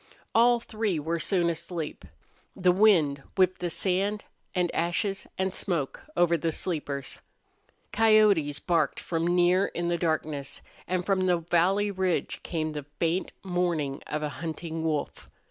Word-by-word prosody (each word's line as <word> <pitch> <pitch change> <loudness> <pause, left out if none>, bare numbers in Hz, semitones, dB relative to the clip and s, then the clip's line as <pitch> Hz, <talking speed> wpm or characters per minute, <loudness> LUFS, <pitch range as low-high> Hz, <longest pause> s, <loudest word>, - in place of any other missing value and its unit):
All 240 +1 +5
three 215 -5 -2
were 165 +3 -2
soon 175 +1 +1
asleep. 165 -1 -4 0.5
The 180 -1 +3
wind 175 -8 +4 0.2
whipped 185 -1 +3
the 175 - -2
sand 195 +4 -1 0.3
and 180 -2 +1
ashes 185 +4 -1
and 190 0 0
smoke 170 -10 -2 0.2
over 170 -1 +4
the 165 +1 -1
sleepers. 145 -6 -4 0.7
Coyotes 210 -9 +4
barked 160 -1 0
from 165 0 -2
near 180 +2 +4
in 175 0 -1
darkness, 155 -4 -2 0.3
and 180 -1 -1
from 190 -2 +1
the 180 -1 +4
valley 180 +5 +2
ridge 185 -2 -1
came 155 -2 -2
the 150 -2 -6
faint 170 +2 0
mourn 175 -7 -1
of 150 0 -3
a 150 - -1
hunting 165 0 -4
wolf. 155 -2 -2
175 Hz, 140 wpm, -27 LUFS, 160-190 Hz, 0.7 s, All